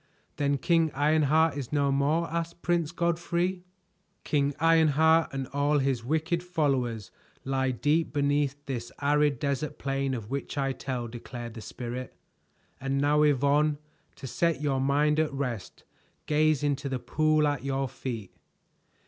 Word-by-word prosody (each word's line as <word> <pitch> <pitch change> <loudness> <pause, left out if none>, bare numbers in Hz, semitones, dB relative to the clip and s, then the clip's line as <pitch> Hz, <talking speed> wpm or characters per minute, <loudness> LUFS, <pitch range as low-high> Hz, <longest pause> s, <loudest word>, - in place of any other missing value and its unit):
"Then 140 -1 +1
King 165 +3 +2
Ironheart 155 +2 +3
is 135 -4 -5
no 140 -2 +2
more?" 150 +5 +1
asked 170 0 -4
Prince 170 -3 +1
Godfrey. 175 +1 -1 0.6
"King 140 -1 0
Ironheart 160 0 +4
and 135 -1 -3
all 145 +1 +2
his 135 -4 0
wicked 160 +6 0
followers 135 - -1 0.3
lie 135 0 0
deep 145 +6 +1
beneath 145 0 +1
this 120 -3 -4
arid 145 -1 +2
desert 140 +2 -2
plain 135 -1 -1
of 115 -1 -7
which 140 +1 -4
I 135 -1 +1
tell," 125 -3 -4
declared 120 0 -8
the 110 - -8
Spirit. 125 +2 -6 0.6
"And 135 0 -1
now, 145 +1 +3
Yvonne, 145 +1 +3 0.4
to - - -10
set 165 +5 0
your 140 -3 0
mind 145 +3 +2
at 155 -1 +1
rest 125 -8 -5 0.4
gaze 155 -1 +2
into 145 -1 -1
the 130 - -1
pool 155 +3 +2
at 145 -2 -2
your 135 0 -1
feet." 120 -5 -6
145 Hz, 145 wpm, -28 LUFS, 135-155 Hz, 0.6 s, Ironheart